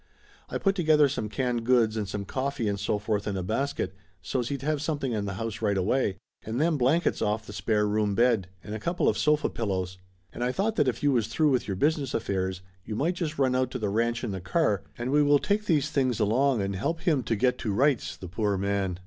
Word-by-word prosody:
I - - -2
put 195 - +2
together 155 -5 +4
some 120 -6 -3
canned 125 0 -1
goods 115 -3 +3
and 105 -3 -2
some 100 0 -4
coffee 130 -1 -2
and 100 -1 -1
so 105 +1 0
forth 105 0 -2
in 100 -2 -1
a 95 - -2
basket, 110 -2 -2 0.3
so's 115 +7 -2
he'd 140 -1 -4
have 150 -1 0
something 145 -4 -2
in 105 -3 -1
the 100 -2 -4
house 115 +1 -4
right 100 -3 +1
away. 100 +1 +1 0.2
And 110 +3 -4
them 160 +1 +2
blan 140 +5 +3
kets - - -1
off 105 +1 -1
the - - -9
spare 105 -2 +1
room 105 -1 +1
bed, 115 -5 +3 0.2
and 105 - -7
a 110 - -3
couple 170 +10 0
of - - +3
sofa 150 0 +2
pil 115 - -4
lows. 95 -1 -2 0.3
And 120 - -4
I 125 - +1
thought 210 +9 0
that - - +3
if 125 +1 -1
you 145 - +4
was 115 -5 +1
through 155 -2 +2
with 130 - +1
your 100 - -2
business 145 +1 +1
affairs 95 -4 -2 0.2
you 110 - -5
might 160 +10 +1
just 165 -4 -3
run 130 -2 +2
out 130 -1 +1
to 130 - -4
the 105 -4 -1
ranch 115 +3 0
in - - -2
the 95 -2 -4
car, 100 - +1 0.2
and 120 +2 -3
we 150 +1 +4
will 145 0 +5
take 210 +7 0
these 150 -5 +1
things 130 -5 +1
along 115 +2 +2
and 100 0 -2
help 160 - -2
him 155 -6 +2
to 115 - -1
get 125 +3 +1
to 110 - -2
rights, 130 +4 +1
the 95 - -8
poor 100 +3 -1
man 100 -2 -1
120 Hz, 250 wpm, -27 LUFS, 105-140 Hz, 0.3 s, will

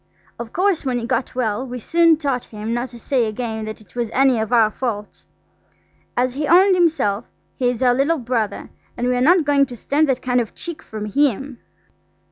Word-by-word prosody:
Of 235 -1 -6
course, 375 -1 +1
when 255 -3 -1
he 235 - -3
got 255 +1 -2
well 230 -2 -1
we 250 -1 -6
soon 335 +5 +3
taught 275 -5 -2
him 215 +1 -5
not 240 +2 -2
to 240 - -12
say 240 0 0
again 220 0 -4
that 215 0 -7
it 200 -1 -22
was 240 -2 -2
any 265 -3 +4
of 220 +1 -3
our 225 -3 +4
faults. 210 -4 -5 0.9
As 250 0 +1
he 290 +2 -2
owned 375 +4 +6
himself, 315 - +1 0.3
he 250 -2 +1
is 245 0 -2
our 250 -1 +5
little 280 +6 +1
brother, 230 -5 -3 0.3
and 245 +1 -1
we 250 - +1
are 245 - 0
not 335 +4 +4
going 280 -1 +3
to 245 - -8
stand 290 +5 +1
that 255 -1 0
kind 250 -1 +2
of 225 - -7
cheek 340 -2 -7
from 215 -1 -7
him. 270 +1 0
250 Hz, 210 wpm, -20 LUFS, 230-280 Hz, 0.9 s, owned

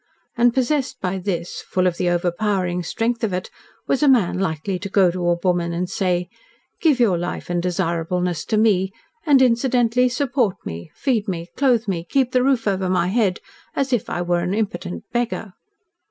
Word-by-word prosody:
And 240 0 +4
possessed 265 +2 0
by 190 0 -2
this 180 -2 -3
full 185 -1 -1
of 175 -2 +1
the 180 - +1
overpowering 180 +1 0
strength 230 +7 -2
of 210 -4 0
it 180 0 -3 0.3
was 270 - 0
a 295 - +4
man 220 -8 +3
likely 180 +1 -2
to 200 +2 -5
go 190 -2 +4
to 175 0 -1
a 175 - +2
woman 175 -2 +1
and 180 +2 -2
say, 180 -2 -1 0.5
"Give 300 -6 +3
your 200 -8 +3
life 175 0 -4
and 175 0 0
desirableness 175 -1 -1
to 220 - 0
me; 195 -3 +2 0.3
and 275 -3 +6
incidentally 250 0 +3
support 245 -6 0
me, 85 +1 -6
feed 230 -6 0
me, 170 -2 -4
clothe 245 -5 +2
me, 175 -4 -1
keep 260 +7 +1
the 255 - +3
roof 260 -4 +2
over 190 -2 0
my 180 -1 +1
head, 200 -3 +1 0.3
as 270 -3 0
if 235 - 0
I 175 - -2
were 175 0 +1
an 175 +3 -1
impotent 90 - -3
beggar"? 240 -4 -2
190 Hz, 185 wpm, -21 LUFS, 175-240 Hz, 0.5 s, and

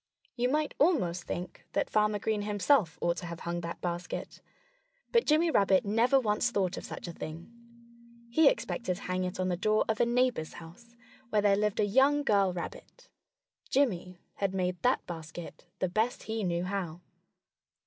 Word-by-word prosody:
You 245 0 +1
might 300 +2 0
almost 185 - +2
think 180 0 -5
that - - +1
Farmer 210 0 +2
Green 210 0 -1
himself 205 - +2
ought 170 0 +1
to 175 - -5
have 170 0 -7
hung 175 0 -3
that 170 0 -6
basket. 175 0 -4 0.7
But 465 0 +3
Jimmy 320 +2 +4
Rabbit 195 -5 +3
never 230 +6 +3
once 220 0 +1
thought 195 -5 0
of - - -7
such - - -7
a 170 - -6
thing. 160 +6 -8 0.8
He 315 +8 +5
expected 235 - -2
to 195 - -11
hang 185 0 -1
it 180 +1 -5
on 185 0 0
the 180 - +1
door 215 +3 +2
of 220 -1 -1
a - - +5
neighbor's 240 -9 +1
house, 230 +9 -13 0.3
where 210 -2 +2
there 200 -1 +5
lived 210 0 0
a - - +4
young 270 +7 +4
girl 200 -7 +3
rabbit. 180 - -8 0.6
Jimmy 185 -10 +1 0.2
had 195 -1 -1
made 180 -1 -1
that 250 +1 +2
basket 165 +1 -8
the 185 - 0
best 220 +7 -1
he 220 -1 -3
knew 175 -1 0
how. 180 -3 -3
200 Hz, 180 wpm, -30 LUFS, 175-235 Hz, 0.8 s, He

